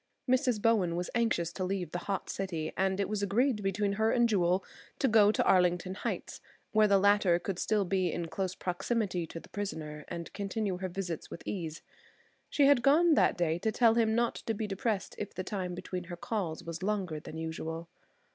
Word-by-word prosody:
Mrs. 250 -3 +2
Bowen 205 -6 +2
was 175 +1 -3
anxious 225 -8 +1
to 185 - -3
leave 185 -1 -2
the 175 - -2
hot 195 - -1
city, 170 -5 -3
and 190 0 +1
it 200 - +1
was 210 -1 -2
agreed 215 +3 +1
between 200 +1 0
her 220 - +4
and 240 -1 +4
Jewel 185 -3 +2 0.3
to 270 - +2
go 215 -3 +6
to - - +1
Arlington 180 0 +3
Heights, - - -4 0.3
where 215 -1 +5
the 200 -1 +5
latter 200 -3 +4
could 185 +1 -4
still 210 -2 +1
be 185 -2 +1
in 170 -1 -3
close 185 +2 -3
proximity 180 -1 -1
to 165 - -7
the - - -16
prisoner 155 -7 -5
and 170 -1 -6
continue 200 -1 -2
her 185 0 -3
visits 175 -3 -4
with - - -8
ease. 165 -5 -4 0.7
She 285 - +3
had 280 -3 +6
gone 315 +6 +5
that - - +3
day 170 -1 +1
to 220 +4 0
tell 230 0 +4
him 225 -1 +2
not 235 0 +2
to 225 - 0
be 215 - -2
depressed 205 0 -2
if 205 - -5
the 185 - -3
time 185 -2 -3
between 180 0 -5
her 175 0 -7
calls 175 -5 -3
was 165 +1 -6
longer 190 -6 -1
than 155 - -9
usual. 160 +1 -5
195 Hz, 205 wpm, -31 LUFS, 175-215 Hz, 0.7 s, go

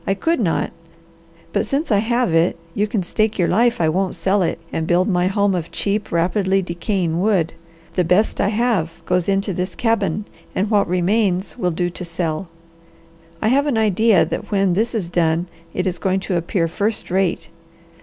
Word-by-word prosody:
"I 195 - +2
could 325 +10 0
not, 180 -8 0 0.8
but - - +2
since 280 0 -2
I 205 - +4
have 235 -2 +1
it, 165 +1 +3 0.2
you 210 +3 0
can 205 -2 -1
stake 215 +4 0
your 175 -3 +2
life 235 +4 +2
I 160 - +2
won't 185 +4 0
sell 195 +1 +1
it 170 -2 0 0.2
and 160 0 -2
build 175 +2 +3
my 180 -3 +2
home 200 0 +2
of 170 -3 -3
cheap, 205 +1 -2
rapidly 190 +3 +1
decaying 170 -1 -1
wood. 190 -6 +1 0.4
The 180 - +2
best 180 +6 +2
I - - +2
have 205 -7 -1
goes 180 0 +1
into 195 0 +1
this 180 +1 -3
cabin 210 -4 0 0.3
and 205 +3 0
what 205 -2 +3
remains 185 -1 +1
will 180 - 0
do 175 +1 -1
to 180 - -6
sell. 170 0 -3 1.0
I 215 - +3
have 280 +4 +3
an 265 -6 +1
idea 215 -4 +4
that 210 +6 -5
when 195 -3 +2
this 225 +6 0
is 200 -6 -1
done 170 -1 +1 0.3
it 185 - -2
is 180 -2 -2
going 190 0 0
to 190 -1 -2
appear 170 0 0
first 205 +4 -2
rate. 185 -4 0
190 Hz, 190 wpm, -20 LUFS, 175-210 Hz, 1.0 s, I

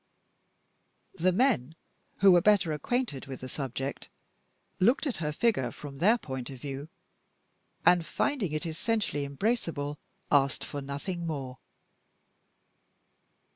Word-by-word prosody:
The 185 0 +2
men 185 - +2 0.5
(who 195 -1 +8
were 175 -1 +6
better 195 -5 +4
acquainted 150 - -2
with 135 -1 -7
the 130 - -5
subject) 135 0 -4 0.7
looked 240 +11 +4
at 275 - -1
her 150 -2 -1
figure 150 - +1
from 140 +1 -9
their 215 +8 +5
point 130 - -6
of 135 -2 -8
view; 140 +3 -6 1.0
and, 175 -1 +6
finding 215 - -1
it 155 +3 -2
essentially 165 -2 -1
embraceable, 150 - -1 0.3
asked 140 -2 +3
for 145 - -5
nothing 165 +6 -4
more. 135 -5 -4
155 Hz, 120 wpm, -29 LUFS, 140-195 Hz, 1.0 s, who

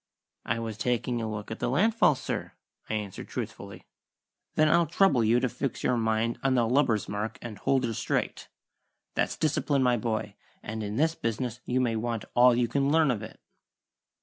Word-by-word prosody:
"I 120 - 0
was 115 -2 -5
taking 125 -1 0
a 110 - -2
look 105 0 -6
at 110 - -5
the - - -1
land 200 - +3
fall, 210 -9 +4
sir," - - -4 0.4
I 110 - -1
answered 105 -3 -5
truthfully. - - -7 0.7
"Then 155 - +4
I'll 170 +1 +4
trouble 155 -7 +3
you 115 +3 +4
to 125 - +1
fix 135 +2 -4
your 125 - +2
mind 110 0 0
on 135 -1 +2
the 120 -2 +3
lubber's 120 -5 +2
mark 105 +2 -3
and 110 -4 -8
hold 135 +3 +1
her 115 - -2
straight. - - -2 0.7
That's - - -1
discipline, 145 -2 +1
my 125 -1 +3
boy, 110 -2 -2 0.3
and 110 0 -5
in 105 0 -4
this 160 +5 +2
business 120 -3 -3
you 125 +1 0
may 120 -3 +1
want 115 -1 -2
all 125 0 +6
you 120 0 +2
can 140 +3 +1
learn 155 -2 +4
of 110 -4 -2
it." 110 - -10
120 Hz, 195 wpm, -28 LUFS, 110-135 Hz, 0.7 s, all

